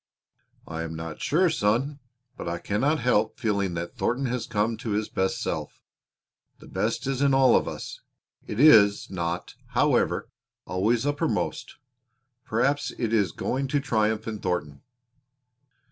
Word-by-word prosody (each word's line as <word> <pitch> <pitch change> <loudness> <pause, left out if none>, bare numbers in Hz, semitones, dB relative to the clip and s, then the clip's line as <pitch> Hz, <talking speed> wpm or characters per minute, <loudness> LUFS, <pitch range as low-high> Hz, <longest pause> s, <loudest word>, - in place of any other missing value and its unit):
"I 80 0 -4
am 80 0 -5
not 80 -1 -7
sure, 175 +6 +3
son, 135 +3 0 0.4
but - - -7
I 85 - -2
cannot 135 - 0
help 125 +2 +2
feeling 100 -6 0
that 85 +1 -5
Thornton 130 +3 0
has 125 -1 -2
come 110 0 0
to 110 -1 -3
his 105 - -2
best 95 -1 -1
self. - - -4 0.8
The - - -15
best - - -2
is 135 0 -1
in 140 -1 +4
all 135 -1 +6
of - - +2
us. - - -7 0.5
It 105 - -4
is 105 -11 +6
not, 85 -1 -3 0.2
however, - - +2 0.4
always 105 +8 +1
uppermost. 145 - -1 0.7
Perhaps 140 +6 0
it 115 -2 -1
is 100 -6 +2
going 135 - -2
to 145 +2 +1
triumph 110 -5 0
in 110 -2 -4
Thornton." 85 -7 -3
110 Hz, 145 wpm, -26 LUFS, 95-135 Hz, 0.8 s, all